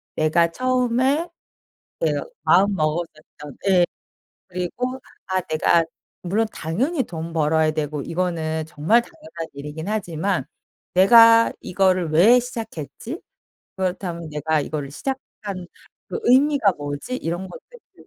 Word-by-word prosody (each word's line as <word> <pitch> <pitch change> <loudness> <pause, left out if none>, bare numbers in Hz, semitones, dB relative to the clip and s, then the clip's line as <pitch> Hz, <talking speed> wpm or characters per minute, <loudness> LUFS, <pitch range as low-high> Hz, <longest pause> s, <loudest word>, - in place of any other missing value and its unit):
내가 165 +2 +2
처음에 255 - +1 0.7
내가 - - 0 0.2
마음 200 +2 +4
먹었었던 155 -3 -4
예. 180 -2 +5 0.6
그리고 235 +9 -3 0.3
아 185 0 0
내가 165 0 +2 0.4
물론 210 +5 0
당연히 255 - -1
돈 165 -3 -7
벌어야 155 0 +2
되고 150 -1 -3
이거는 160 -2 -2
정말 165 +10 +3
당연한 310 - -9
일이기는 150 +7 -6
하지만 190 -2 -1 0.5
'내가 230 +4 +7
이거를 185 -2 +1
왜 210 +11 +6
시작했지? 235 - -6 0.6
그렇다면 180 -3 -3
내가 150 +1 0
이거를 145 -1 -4
시작한 200 - -6 0.4
그 455 - -3
의미가 265 - +4
뭐지?' 145 - -5
이런 175 -1 -4
것들을 485 - -16
180 Hz, 260 characters per minute, -22 LUFS, 160-235 Hz, 0.7 s, 내가